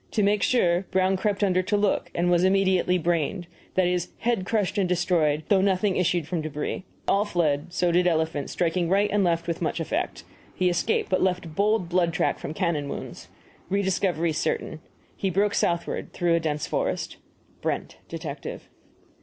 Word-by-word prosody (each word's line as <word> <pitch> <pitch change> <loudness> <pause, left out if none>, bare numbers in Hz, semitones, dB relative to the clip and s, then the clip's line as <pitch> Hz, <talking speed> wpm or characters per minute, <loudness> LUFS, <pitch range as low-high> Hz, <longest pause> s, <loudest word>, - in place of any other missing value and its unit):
To 215 - +2
make 205 +1 +2
sure, 180 -6 +2
Brown 190 0 +2
crept 205 +1 0
under 185 -2 +3
to 205 +3 0
look, 205 -1 +1
and 175 +1 +2
was 175 0 +3
immediately 190 -1 +3
brained 175 +2 -1 0.3
that 185 - +3
is, 180 -1 0
head 225 -5 -1
crushed 210 -2 0
and 185 -2 +1
destroyed, 165 -4 +1
though 195 -3 +5
nothing 195 0 +2
issued 175 -3 +1
from 170 -1 -2
debris. 155 +4 -4 0.2
All 200 - +3
fled 165 -6 0
so 175 0 +1
did 180 +1 +3
elephant, 160 -4 0
striking 170 0 0
right 200 +2 +2
and 205 -1 +3
left 170 -1 +1
with 170 0 -3
much 165 - -1
effect. 165 - -2 0.3
Has 180 -1 +3
escaped, 180 +5 0
but 185 - +2
left 180 -3 0
bold 205 +1 +1
blood 175 -1 +1
track - - 0
from 155 - -6
cannon 160 -6 -1
wounds. - - -7 0.4
Rediscovery 185 -4 +1
certain. 155 0 -2 0.3
He 195 - -1
broke 200 +3 +1
southward, 170 -3 -1
through 175 -1 +1
a 170 - +3
dense 150 -2 -2
forest. - - -2 0.4
BRENT, - - -3
Detective. - - -7
180 Hz, 175 wpm, -25 LUFS, 170-195 Hz, 0.4 s, though